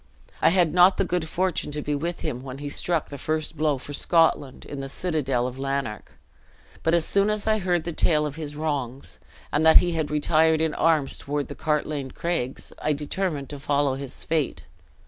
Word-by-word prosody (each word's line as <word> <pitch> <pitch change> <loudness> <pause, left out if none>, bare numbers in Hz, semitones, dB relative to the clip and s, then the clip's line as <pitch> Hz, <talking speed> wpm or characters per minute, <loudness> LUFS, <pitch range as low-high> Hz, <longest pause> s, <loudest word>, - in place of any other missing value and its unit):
I - - +6
had 175 -2 +3
not 180 +2 +6
the - - +2
good 175 -3 -2
fortune 180 -4 -1
to 150 - -2
be 150 - -1
with 170 +4 -3
him, 130 -5 -3
when 130 0 -7
he 145 +1 -5
struck 170 +1 -1
the 140 - -8
first 155 +2 -2
blow 155 -2 +1
for 145 +3 -8
Scotland 160 -4 +2
in 140 - -7
the 135 0 -5
citadel 135 -7 -1
of 130 +1 -5
Lanark; 135 -5 -3 0.7
but 165 +1 +2
as 170 -2 +2
soon 200 +1 +2
as 210 -1 0
I 220 0 +2
heard 175 -3 0
the 170 - -4
tale 150 -1 +3
of 145 -1 -4
his 150 -2 -6
wrongs, 140 -4 -3 0.3
and 150 - +1
that 160 0 +8
he 175 - +4
had 160 -3 -1
retired 155 +1 +3
in 160 -1 0
arms 155 -4 +1
toward 145 0 -3
the - - -6
Cartlane 150 -3 -1
Craigs, 165 -7 -3
I 155 - +1
determined 150 0 -3
to 145 - -7
follow 145 -1 +1
his 135 0 -6
fate. 155 -4 -1
150 Hz, 205 wpm, -25 LUFS, 140-165 Hz, 0.7 s, that